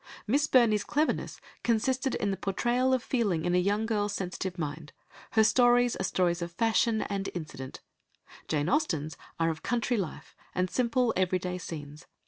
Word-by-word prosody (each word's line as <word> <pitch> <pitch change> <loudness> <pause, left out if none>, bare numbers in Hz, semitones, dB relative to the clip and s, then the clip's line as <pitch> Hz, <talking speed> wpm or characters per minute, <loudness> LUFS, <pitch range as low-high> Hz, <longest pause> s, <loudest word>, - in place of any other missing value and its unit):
Miss 285 +7 +2
Burney's 225 -7 +4
cleverness 305 +2 -1 0.2
consisted 260 +4 +1
in 200 - 0
the - - -1
portrayal 240 +7 0
of 260 -2 +1
feeling 205 -11 0
in 175 - +1
a 180 - +4
young 205 +4 +1
girl's 210 -2 0
sensitive 185 0 -4
mind, 150 -1 -5 0.4
her 220 -1 +5
stories 245 +1 +4
are - - -3
stories 175 -2 +1
of 170 0 -4
fashion 225 +2 +2
and 195 -1 -3
incident; 135 -6 -7 0.7
Jane 150 -1 0
Austen's 160 - 0 0.2
are 165 0 +2
of 160 - -7
country 240 0 0
life, 185 -7 -5 0.2
and 180 0 0
simple 245 -1 +1
everyday 180 0 0
scenes. 150 -3 -8
200 Hz, 160 wpm, -29 LUFS, 175-240 Hz, 0.7 s, her